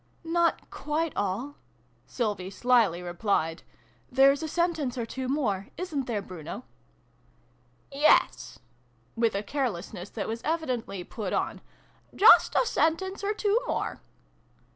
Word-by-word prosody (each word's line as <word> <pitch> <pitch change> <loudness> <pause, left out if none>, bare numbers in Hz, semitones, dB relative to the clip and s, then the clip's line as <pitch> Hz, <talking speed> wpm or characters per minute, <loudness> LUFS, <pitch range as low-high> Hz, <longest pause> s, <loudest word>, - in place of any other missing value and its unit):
" - - -37
Not 335 0 0
quite 305 +3 -2
all," 205 +9 -2 0.5
Sylvie 205 -6 -2
slily 215 -5 +2
replied. 175 -2 -1 0.3
" 120 0 -35
There's 275 +2 +5
a 320 - -3
sentence 320 -6 -1
or 235 - -2
two 260 +3 -5
more. 230 -9 -1
Isn't 305 -8 -3
there, 215 -4 -2
Bruno? 180 -6 -8 0.5
" - - -36
" 120 - -37 0.3
Yes," 135 - +3 0.6
with 230 -2 +1
a 200 - -1
carelessness 205 -7 -3
that 210 - -4
was 225 +1 -4
evi 320 +1 -1
dently 225 - -4
put 210 -5 -4
on: - - -1 0.5
"just 420 - +7
a - - +4
sentence 380 +1 0
or 415 +1 0
two 425 +3 +1
more." - - -2
245 Hz, 140 wpm, -28 LUFS, 195-310 Hz, 0.6 s, just